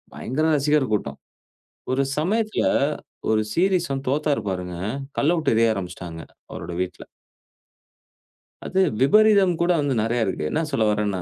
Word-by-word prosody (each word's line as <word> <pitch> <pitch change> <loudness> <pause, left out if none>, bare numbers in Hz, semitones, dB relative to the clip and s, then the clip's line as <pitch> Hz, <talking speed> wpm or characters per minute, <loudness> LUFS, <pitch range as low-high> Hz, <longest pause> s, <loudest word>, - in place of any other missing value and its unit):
பயங்கர 150 +6 -2
ரசிகர் 145 -3 +1
கூட்டம். 70 -9 -2 0.7
ஒரு 135 +1 +2
சமயத்தில 215 +7 0 0.7
ஒரு 110 - +3
சீரிஸ் 180 -2 +1
வந்து 135 0 -4
தோத்தாரு, 145 +1 0
பாருங்க. 90 -1 -4 0.4
கல்ல 160 +5 +3
விட்டு 155 -7 +1
எரிய 115 -1 +3
ஆரம்பிச்சிட்டாங்க, 90 -3 -6 0.3
அவரோட 85 - -6
வீட்ல. 90 - -5 1.6
அது 190 +1 +1 0.2
விபரீதம் 200 +3 +5
கூட 175 +1 +3
வந்து 140 -2 0
நிறைய 115 0 0
இருக்கு. 95 -5 -3
என்ன 160 - 0
சொல்ல 110 - +1
வரேன்னா, 105 -3 -1
135 Hz, 135 wpm, -23 LUFS, 105-170 Hz, 1.6 s, விபரீதம்